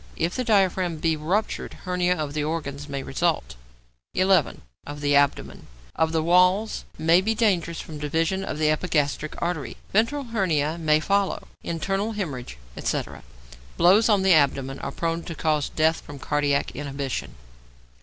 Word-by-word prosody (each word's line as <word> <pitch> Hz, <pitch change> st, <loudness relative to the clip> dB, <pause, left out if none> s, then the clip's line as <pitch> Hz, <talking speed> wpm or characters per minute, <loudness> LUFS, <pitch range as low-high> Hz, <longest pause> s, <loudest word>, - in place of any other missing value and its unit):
If 170 Hz, -, -1 dB
the 255 Hz, -, -1 dB
diaphragm 190 Hz, -6 st, +2 dB
be 160 Hz, +1 st, +1 dB
ruptured, 175 Hz, +8 st, -2 dB
hernia 180 Hz, 0 st, +1 dB
of 150 Hz, -4 st, -4 dB
the 150 Hz, -1 st, -1 dB
organs 150 Hz, -2 st, -4 dB
may 140 Hz, -1 st, -4 dB
result. 160 Hz, -, -1 dB, 0.6 s
11. 185 Hz, -5 st, +2 dB, 0.2 s
=Of 145 Hz, 0 st, -8 dB
the 145 Hz, 0 st, +2 dB
Abdomen.= 140 Hz, -1 st, +1 dB, 0.3 s
Of 160 Hz, 0 st, +1 dB
the 160 Hz, -1 st, 0 dB
walls, 180 Hz, +5 st, +3 dB
may 165 Hz, +3 st, +4 dB
be 220 Hz, +3 st, 0 dB
dangerous 180 Hz, -7 st, +1 dB
from 155 Hz, -2 st, -8 dB
division 165 Hz, +6 st, 0 dB
of 155 Hz, -, -4 dB
the 155 Hz, 0 st, +2 dB
epigastric 155 Hz, -2 st, -1 dB
artery; 170 Hz, -5 st, -3 dB, 0.2 s
ventral 230 Hz, +8 st, +2 dB
hernia 165 Hz, -6 st, 0 dB
may 155 Hz, -1 st, +3 dB
follow, 200 Hz, +4 st, 0 dB, 0.2 s
internal 195 Hz, +6 st, -2 dB
hæmorrhage, 135 Hz, -, -5 dB, 0.2 s
etc. -, -, -3 dB, 0.6 s
Blows 205 Hz, +6 st, +5 dB
on 205 Hz, -3 st, +3 dB
the 190 Hz, -1 st, +5 dB
abdomen 135 Hz, -3 st, +2 dB
are -, -, -4 dB
prone 165 Hz, 0 st, -2 dB
to 165 Hz, -, -7 dB
cause 155 Hz, -3 st, 0 dB
death 160 Hz, +1 st, +1 dB
from 145 Hz, -, -10 dB
cardiac 145 Hz, 0 st, 0 dB
inhibition. 140 Hz, -, -4 dB
165 Hz, 155 wpm, -24 LUFS, 145-185 Hz, 0.6 s, Blows